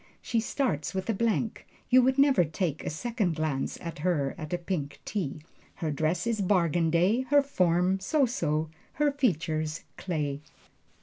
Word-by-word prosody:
She 230 - -1
starts 220 - -1
with 190 +4 -1
a - - -1
blank 225 +1 -1 0.2
you 255 +1 +8
would 260 +2 +2
never 275 -9 +5
take 160 -1 -2
a - - -2
second 205 +1 -1
glance 155 -4 -2
at 170 -3 -7
her 150 -5 0
at 155 -2 -7
a 175 - +1
pink 170 -5 -4
tea. 155 -7 -3 0.3
Her 160 -2 -2
dress 155 +4 0
is 230 -3 0
bargain 175 -4 +2
day, 180 +9 +3
her 285 0 +5
form 180 -7 +2
so 275 +9 +2
so, 155 -9 -1 0.2
her 295 0 +2
features 160 - -1
clay. 150 -6 -2
175 Hz, 165 wpm, -28 LUFS, 155-230 Hz, 0.3 s, you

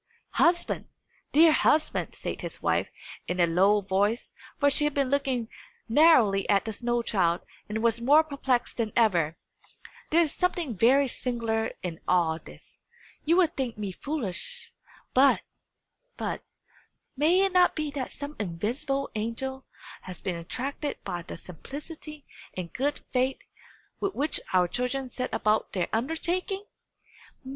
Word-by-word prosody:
"Husband! 345 +1 +2 0.5
dear 320 +2 +7
husband!" 305 0 +2
said - - -5
his - - -6
wife, - - +1 0.4
in 180 - -2
a 175 - +6
low 195 +5 +4
voice 200 +4 0 0.3
for 285 -1 +4
she 295 +2 +4
had 295 - -1
been 275 -2 +1
looking 265 -5 0 0.4
narrowly 230 -7 +5
at 200 +1 +3
the 220 - -3
snow 240 +2 -1
child, 175 -6 +1 0.3
and 220 +1 -2
was 235 0 +2
more 290 +6 +6
perplexed 270 -5 -1
than 225 -3 -1
ever 175 -9 +3 0.7
there 335 +2 +5
is 315 -4 0
something 350 - -1
very 265 +8 +4
singular 230 -3 -1
in 170 -2 -4
all 165 -3 +2
this. - - -15 0.4
"You 330 +3 +4
will 370 - +6
think 265 -8 -4
me 205 -2 -3
foolish 280 - -4 0.4
but 270 +2 +5 0.8
but - - -3 0.7
may 320 +7 +4
it 390 - 0
not 360 -1 +5
be 305 -2 -2
that 275 -3 -4
some 285 +1 -7
invisible 240 - -2
angel 245 +5 -4 0.4
has 185 -2 -9
been 185 - -3
attracted 270 - -4
by 175 - -4
the 165 - -8
simplicity 295 - -9 0.3
and 175 -2 -5
good 285 +3 -1
faith 260 +1 +1 0.6
with 395 -1 -2
which 295 +2 -1
our 180 -1 +4
children 250 +5 -2
set 255 +1 -3
about 215 +1 +1
their 180 -3 -1
undertaking? 345 - -1
250 Hz, 145 wpm, -27 LUFS, 205-295 Hz, 0.8 s, dear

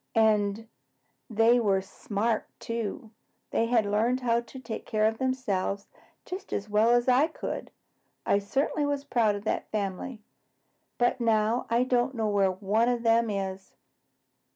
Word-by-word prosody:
"And 215 -1 +2 0.6
they 225 +2 +4
were 200 -4 +2
smart, 210 +3 -2
too. 230 +1 -4 0.4
They 230 - +1
had 230 -3 +3
learned 225 +5 +1
how 235 -1 +2
to 240 +3 -12
take 230 -3 -6
care 215 -1 0
of 220 +1 +1
themselves 205 -7 -1 0.4
just 380 +2 -7
as 200 - -2
well 210 +2 +3
as 240 +1 +3
I 255 +4 +5
could. 320 - -5 0.6
I 200 - +3
certainly 275 +8 -1
was 285 -1 -1
proud 230 -7 +2
of 205 - -6
that 215 - -2
family. 210 +3 -4 0.7
But 245 +1 +1
now 225 +1 +2
I 235 +2 +3
don't 255 +1 +1
know 220 -2 0
where 200 -2 +3
one 205 +5 +1
of 240 -1 -1
them 230 0 +3
is." 195 -1 -4
225 Hz, 155 wpm, -28 LUFS, 205-245 Hz, 0.7 s, I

